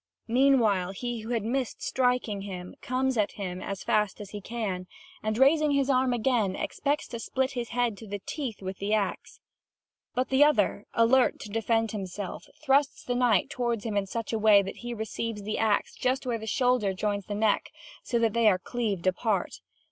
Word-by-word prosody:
Meanwhile, 230 Hz, -7 st, +3 dB
he 240 Hz, +3 st, -4 dB
who 220 Hz, +1 st, -8 dB
had 230 Hz, -3 st, 0 dB
missed 250 Hz, +2 st, -2 dB
striking 250 Hz, -5 st, 0 dB
him 180 Hz, -2 st, -7 dB
comes 255 Hz, -1 st, 0 dB
at 205 Hz, -, +1 dB
him 185 Hz, -2 st, -5 dB
as 195 Hz, -2 st, -5 dB
fast 210 Hz, -1 st, +1 dB
as 205 Hz, -2 st, -8 dB
he 205 Hz, -, -6 dB
can 195 Hz, -5 st, -4 dB, 0.3 s
and, 215 Hz, 0 st, -1 dB
raising 295 Hz, +3 st, +4 dB
his 280 Hz, -1 st, +2 dB
arm 255 Hz, -1 st, +3 dB
again, 230 Hz, -5 st, +1 dB
expects 290 Hz, +8 st, -1 dB
to 235 Hz, -, -5 dB
split 265 Hz, +3 st, -1 dB
his 240 Hz, -3 st, -4 dB
head 240 Hz, -2 st, 0 dB
to 220 Hz, -, -10 dB
the 205 Hz, +1 st, -4 dB
teeth 235 Hz, 0 st, -5 dB
with 190 Hz, 0 st, -5 dB
the 205 Hz, +2 st, +1 dB
axe. 200 Hz, -3 st, -3 dB, 0.8 s
But 255 Hz, +1 st, 0 dB
the 265 Hz, +2 st, +5 dB
other, 210 Hz, -8 st, +2 dB
alert 245 Hz, +3 st, +4 dB
to 210 Hz, -, -7 dB
defend 225 Hz, +1 st, 0 dB
himself, 195 Hz, -1 st, -5 dB, 0.2 s
thrusts 275 Hz, -1 st, +2 dB
the 245 Hz, -, -2 dB
knight 245 Hz, -6 st, +2 dB
toward 235 Hz, -4 st, -1 dB
him 220 Hz, -3 st, -3 dB
in 200 Hz, -1 st, 0 dB
such 230 Hz, +3 st, -4 dB
a 225 Hz, -, 0 dB
way 210 Hz, -2 st, +6 dB
that 195 Hz, -, -6 dB
he 240 Hz, 0 st, -5 dB
receives 220 Hz, -1 st, -4 dB
the 215 Hz, +1 st, -2 dB
axe 215 Hz, -2 st, +1 dB
just 260 Hz, +1 st, -1 dB
where 235 Hz, -2 st, -1 dB
the 220 Hz, -, -7 dB
shoulder 245 Hz, -4 st, +2 dB
joins 205 Hz, 0 st, -2 dB
the 205 Hz, -, -3 dB
neck, 215 Hz, 0 st, +1 dB, 0.3 s
so 240 Hz, -, -1 dB
that 230 Hz, -2 st, +2 dB
they 235 Hz, -1 st, +3 dB
are 195 Hz, -3 st, +5 dB
cleaved 205 Hz, -3 st, -3 dB
apart. 195 Hz, +3 st, 0 dB
225 Hz, 195 wpm, -28 LUFS, 205-250 Hz, 0.8 s, way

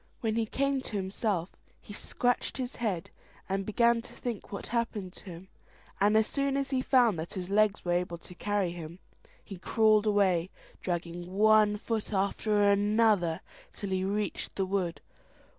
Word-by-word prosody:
When 220 Hz, -2 st, 0 dB
he 225 Hz, -1 st, 0 dB
came 275 Hz, +3 st, 0 dB
to 225 Hz, -, -7 dB
himself, 190 Hz, -2 st, -1 dB, 0.3 s
he 205 Hz, -, -11 dB
scratched 245 Hz, +3 st, -1 dB
his 255 Hz, -1 st, -4 dB
head, 195 Hz, -5 st, -2 dB, 0.4 s
and 195 Hz, 0 st, -2 dB
began 235 Hz, +2 st, +3 dB
to -, -, -12 dB
think 235 Hz, -5 st, -5 dB
what 200 Hz, -, -5 dB
happened 225 Hz, -5 st, -2 dB
him; 180 Hz, -1 st, -10 dB, 0.5 s
and 210 Hz, +2 st, +4 dB
as 220 Hz, -, +4 dB
soon 275 Hz, +2 st, 0 dB
as 275 Hz, 0 st, -2 dB
he 260 Hz, -1 st, +1 dB
found 245 Hz, -, +3 dB
that 160 Hz, -, -5 dB
his 185 Hz, 0 st, -5 dB
legs 210 Hz, -1 st, +2 dB
were 175 Hz, -, 0 dB
able 175 Hz, -1 st, 0 dB
to 175 Hz, -, -13 dB
carry 200 Hz, -1 st, -1 dB
him, 170 Hz, -1 st, -8 dB, 0.5 s
he 195 Hz, -4 st, -9 dB
crawled 215 Hz, +2 st, +3 dB
away, 190 Hz, -4 st, +2 dB, 0.3 s
dragging 175 Hz, 0 st, -4 dB
one 210 Hz, +1 st, +5 dB
foot 220 Hz, 0 st, -3 dB
after 205 Hz, +1 st, +1 dB
another, 205 Hz, -4 st, +2 dB, 0.3 s
till 200 Hz, -2 st, -6 dB
he 185 Hz, 0 st, 0 dB
reached 205 Hz, +1 st, -2 dB
the 195 Hz, -, 0 dB
wood. 185 Hz, -3 st, -2 dB
205 Hz, 165 wpm, -30 LUFS, 185-220 Hz, 0.5 s, one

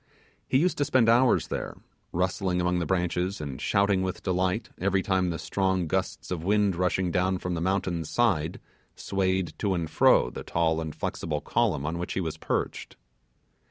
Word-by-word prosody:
He -, -, +3 dB
used 170 Hz, +2 st, +1 dB
to 145 Hz, -, +2 dB
spend 130 Hz, -5 st, +3 dB
hours 120 Hz, +2 st, +4 dB
there, -, -, -4 dB, 0.3 s
rustling 90 Hz, +1 st, 0 dB
among 90 Hz, 0 st, +1 dB
the 85 Hz, -, -2 dB
branches, 90 Hz, +2 st, 0 dB
and 70 Hz, -4 st, -6 dB
shouting 100 Hz, -1 st, +2 dB
with 95 Hz, -1 st, -3 dB
delight 95 Hz, +3 st, 0 dB
every 95 Hz, 0 st, +1 dB
time 95 Hz, -2 st, +1 dB
the 85 Hz, -, -2 dB
strong 95 Hz, -1 st, 0 dB
gusts 80 Hz, -, -2 dB
of 85 Hz, -3 st, -3 dB
wind 100 Hz, 0 st, +2 dB
rushing 90 Hz, 0 st, 0 dB
down 95 Hz, +2 st, +1 dB
from 90 Hz, 0 st, -3 dB
the 85 Hz, -, -2 dB
mountain 90 Hz, -2 st, 0 dB
side, 90 Hz, -5 st, +1 dB, 0.4 s
swayed 95 Hz, -2 st, -1 dB
to 100 Hz, -3 st, +1 dB
and 85 Hz, -2 st, -2 dB
fro -, -, +4 dB
the -, -, -7 dB
tall 80 Hz, -1 st, 0 dB
and 80 Hz, -1 st, -5 dB
flexible 75 Hz, -2 st, -3 dB
column 70 Hz, 0 st, 0 dB
on 80 Hz, +3 st, -2 dB
which 85 Hz, -, -3 dB
he -, -, -1 dB
was 80 Hz, -4 st, -3 dB
perched. -, -, -3 dB
90 Hz, 180 wpm, -27 LUFS, 85-95 Hz, 0.4 s, hours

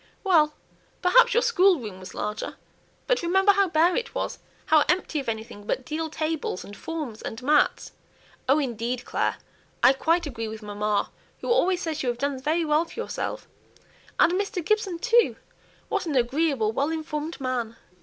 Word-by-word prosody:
"Well! 315 Hz, -6 st, +4 dB, 0.5 s
perhaps 480 Hz, +6 st, +5 dB
your 480 Hz, -, +4 dB
schoolroom 355 Hz, -, +2 dB
was 185 Hz, 0 st, -10 dB
larger, 210 Hz, +1 st, -4 dB, 0.5 s
but -, -, +1 dB
remember 380 Hz, +3 st, +4 dB
how 395 Hz, -1 st, +2 dB
bare 330 Hz, +2 st, +3 dB
it 470 Hz, -, -3 dB
was, -, -, -3 dB, 0.3 s
how 310 Hz, -2 st, +5 dB
empty 355 Hz, -3 st, +1 dB
of 270 Hz, -, -4 dB
anything 220 Hz, -2 st, -6 dB
but 260 Hz, -, -1 dB
deal 315 Hz, +2 st, -3 dB
tables, 310 Hz, -, -3 dB
and 205 Hz, -, -10 dB
forms, 300 Hz, -9 st, -6 dB
and 225 Hz, -, -6 dB
mats. 295 Hz, +2 st, +2 dB, 0.6 s
Oh, 275 Hz, -, +6 dB
indeed, 245 Hz, -3 st, -2 dB
Clare, -, -, 0 dB, 0.5 s
I 265 Hz, -, +8 dB
quite 330 Hz, +5 st, +1 dB
agree 230 Hz, -6 st, -4 dB
with 220 Hz, 0 st, -8 dB
mamma, 205 Hz, 0 st, -1 dB, 0.3 s
who -, -, -2 dB
always 375 Hz, -7 st, +2 dB
says 315 Hz, -2 st, -2 dB
you 255 Hz, -, 0 dB
have 240 Hz, -, -2 dB
done 280 Hz, 0 st, -2 dB
very 320 Hz, +4 st, +1 dB
well 305 Hz, +2 st, +2 dB
for 340 Hz, -, -10 dB
yourself; -, -, -4 dB, 0.7 s
and -, -, +6 dB
Mr. 370 Hz, -2 st, -2 dB
Gibson 425 Hz, -4 st, +1 dB
too! 475 Hz, +5 st, +3 dB, 0.5 s
What -, -, -2 dB
an 300 Hz, -, -1 dB
agreeable, 260 Hz, -2 st, +1 dB
well 280 Hz, +6 st, 0 dB
informed 315 Hz, 0 st, -4 dB
man!" 250 Hz, -4 st, -2 dB
305 Hz, 170 wpm, -25 LUFS, 240-355 Hz, 0.7 s, I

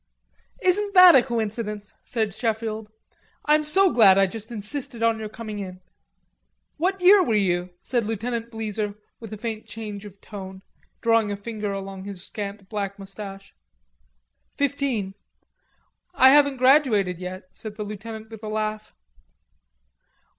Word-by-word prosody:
"Isn't 400 Hz, +2 st, +1 dB
that 365 Hz, -1 st, +10 dB
a 265 Hz, -, +7 dB
coincidence?" 220 Hz, -3 st, -4 dB
said 220 Hz, -4 st, -2 dB
Sheffield. 220 Hz, -1 st, -3 dB, 0.6 s
"I'm 300 Hz, +1 st, +4 dB
so 375 Hz, +5 st, +4 dB
glad 200 Hz, -5 st, +7 dB
I 195 Hz, -, +5 dB
just 220 Hz, +4 st, -7 dB
insisted 235 Hz, +3 st, -5 dB
on 230 Hz, -1 st, +2 dB
your 215 Hz, -1 st, -5 dB
coming 215 Hz, -1 st, -7 dB
in." 185 Hz, -2 st, -7 dB, 1.0 s
"What 375 Hz, +5 st, 0 dB
year 380 Hz, +2 st, +7 dB
were 230 Hz, -10 st, +1 dB
you?" 180 Hz, -3 st, +1 dB, 0.2 s
asked -, -, -11 dB
Lieutenant 230 Hz, +2 st, -3 dB
Bleezer, 215 Hz, -2 st, -3 dB, 0.2 s
with 225 Hz, -3 st, -10 dB
a 215 Hz, -, -6 dB
faint 220 Hz, 0 st, -5 dB
change 210 Hz, -2 st, -7 dB
of 200 Hz, -1 st, -12 dB
tone, 190 Hz, -2 st, -9 dB, 0.4 s
drawing 230 Hz, -2 st, +3 dB
a 200 Hz, -, -3 dB
finger 210 Hz, -1 st, -4 dB
along 195 Hz, -1 st, -6 dB
his 195 Hz, -3 st, -3 dB
scant 200 Hz, -1 st, -6 dB
black 200 Hz, -1 st, -4 dB
moustache. 195 Hz, 0 st, -9 dB, 1.0 s
"Fifteen." 270 Hz, -8 st, -1 dB, 1.0 s
"I 260 Hz, -3 st, +7 dB
haven't 285 Hz, -1 st, +5 dB
graduated 245 Hz, -, +3 dB
yet," 185 Hz, 0 st, -8 dB
said 215 Hz, -2 st, -8 dB
the 210 Hz, -, -4 dB
lieutenant 220 Hz, +2 st, -8 dB
with 220 Hz, -2 st, -10 dB
a 215 Hz, -, -6 dB
laugh. 215 Hz, 0 st, -3 dB
215 Hz, 140 wpm, -24 LUFS, 200-240 Hz, 1.0 s, that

